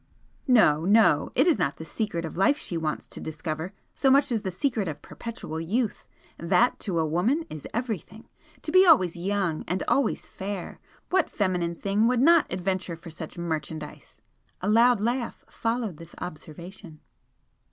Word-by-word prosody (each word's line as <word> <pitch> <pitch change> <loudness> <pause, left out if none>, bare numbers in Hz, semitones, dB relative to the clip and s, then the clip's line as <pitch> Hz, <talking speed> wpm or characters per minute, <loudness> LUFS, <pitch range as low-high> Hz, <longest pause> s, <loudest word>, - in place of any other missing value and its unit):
"No, 190 - +5
no! 200 -6 +4
It 270 - +4
is 340 -4 +3
not 140 - 0
the 160 - -9
secret 170 -3 -3
of 160 - -7
life 195 - +3
she 180 - -4
wants 160 -2 -2
to - - -9
discover 155 +3 -4 0.2
so 270 - +2
much 275 +1 +4
as 225 -3 0
the 190 - -3
secret 210 +2 -1
of 145 -2 -6
perpetual 225 -9 -6
youth! 210 +7 -2 0.3
That, 185 +8 +2
to 185 -4 -2
a 160 - +2
woman, 210 - +1
is 155 -2 -7
everything! 220 -2 -4 0.4
To 310 - -3
be 370 +2 +7
always 250 - +5
young 185 -2 -1
and 180 +2 -1
always 270 -5 +1
fair! 195 -1 -6 0.3
What 370 -2 +2
feminine 180 -4 -1
thing 205 +5 +1
would 250 0 +2
not 330 +4 +5
'adventure 185 -1 -2
for 165 0 -11
such 160 +1 -7
merchandise'!" 160 -2 -5 0.4
A 185 - -4
loud 230 +2 +5
laugh 240 +2 -2
followed 225 -6 -2
this 165 +1 -12
observation. 170 +1 -9
190 Hz, 165 wpm, -26 LUFS, 165-235 Hz, 0.4 s, be